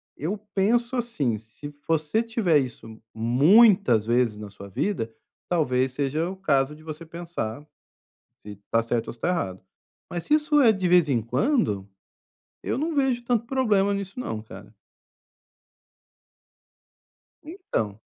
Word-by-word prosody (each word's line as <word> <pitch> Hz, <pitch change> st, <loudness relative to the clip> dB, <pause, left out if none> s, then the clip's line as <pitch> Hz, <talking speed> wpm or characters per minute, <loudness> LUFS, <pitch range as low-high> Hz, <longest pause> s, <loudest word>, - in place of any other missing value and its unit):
Eu 180 Hz, +9 st, -3 dB, 0.2 s
penso 235 Hz, +6 st, +2 dB
assim, 150 Hz, -, -1 dB
se 115 Hz, +7 st, -11 dB
você 160 Hz, +6 st, +1 dB
tiver 225 Hz, -, +2 dB
isso 115 Hz, -4 st, -7 dB
muitas 135 Hz, -, +5 dB
vezes 120 Hz, -2 st, +1 dB
na 105 Hz, -1 st, -8 dB
sua 100 Hz, 0 st, -11 dB
vida, 115 Hz, -, -2 dB, 0.4 s
talvez 130 Hz, -7 st, +1 dB
seja 145 Hz, +5 st, -1 dB
o 190 Hz, -, -7 dB
caso 145 Hz, -5 st, +1 dB
de 155 Hz, -, -16 dB
você 155 Hz, +1 st, -8 dB
pensar, 165 Hz, -6 st, -6 dB, 0.8 s
se 105 Hz, 0 st, -9 dB
tá 115 Hz, -, +3 dB
certo 115 Hz, 0 st, -1 dB
ou -, -, -5 dB
se 115 Hz, -, -21 dB
tá 175 Hz, -, 0 dB
errado, 95 Hz, -, -2 dB, 0.5 s
mas 175 Hz, -1 st, -5 dB
se 300 Hz, -, +1 dB
isso 300 Hz, -1 st, +2 dB
é 230 Hz, -4 st, +7 dB
de 190 Hz, -3 st, -1 dB
vez 175 Hz, -3 st, +5 dB
em 120 Hz, -4 st, +2 dB
quando, 115 Hz, -, 0 dB, 0.7 s
eu -, -, -2 dB
não 320 Hz, +2 st, -1 dB
vejo 265 Hz, -4 st, +1 dB
tanto 235 Hz, -1 st, 0 dB
problema 210 Hz, -7 st, +2 dB
nisso 200 Hz, +3 st, -5 dB
não 110 Hz, -, -4 dB
cara. 100 Hz, 0 st, -13 dB, 2.7 s
Então. 110 Hz, -, -4 dB
155 Hz, 140 wpm, -25 LUFS, -, 2.7 s, é